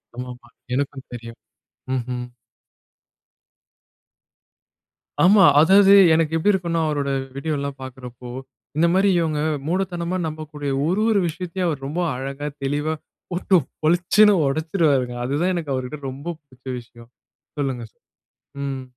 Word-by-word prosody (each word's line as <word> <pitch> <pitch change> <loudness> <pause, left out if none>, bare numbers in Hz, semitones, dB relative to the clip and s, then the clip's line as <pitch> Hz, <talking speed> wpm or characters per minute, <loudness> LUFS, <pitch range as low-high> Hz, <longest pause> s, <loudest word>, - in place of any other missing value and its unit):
ஆமா. 125 +1 -5
ஆமா. 120 -1 -18 0.2
எனக்கும் 135 0 -2
தெரியும். 115 -1 -8 0.6
ம்ஹ்ம். 125 0 -3 2.9
ஆமா 195 +2 +7 0.2
அதாவது 195 +4 +7 0.2
எனக்கு 160 0 +2
எப்படி 205 +6 +3
இருக்கும்னா 170 -3 0
அவரோட 145 -2 -1 0.3
வீடியோலாம் 140 -2 -3
பார்க்கிறப்போ 125 -1 -9 0.5
இந்த 170 +2 +4
மாரி 195 +1 +4
இவங்க 155 -3 0 0.3
மூடத்தனமா 180 -1 -1
நம்பக்கூடிய 150 -2 -5 0.2
ஒரு 185 +6 +1
ஒரு 210 - +3
விஷயத்தையும் 180 +2 -3
அவர் 140 -4 -3
ரொம்ப 160 +5 -3 0.2
அழகா 135 +3 -5 0.2
தெளிவா 145 +3 -1 0.4
போட்டு 185 +2 +1 0.3
பொளிச்சுனு 180 +6 +5
உடச்சிருவாருங்க. 145 -4 +1
அதுதான் 150 +8 0
எனக்கு 155 -5 -3
அவர்கிட்ட 130 +3 -3
எனக்கு 135 -2 -5
ரொம்ப 145 +6 -5
புடிச்ச 130 -3 -24
விஷயம். 120 0 -16 0.5
சொல்லுங்க. 135 -4 -2 0.8
ம். 135 -1 -3
150 Hz, 115 wpm, -22 LUFS, 130-170 Hz, 2.9 s, ஆமா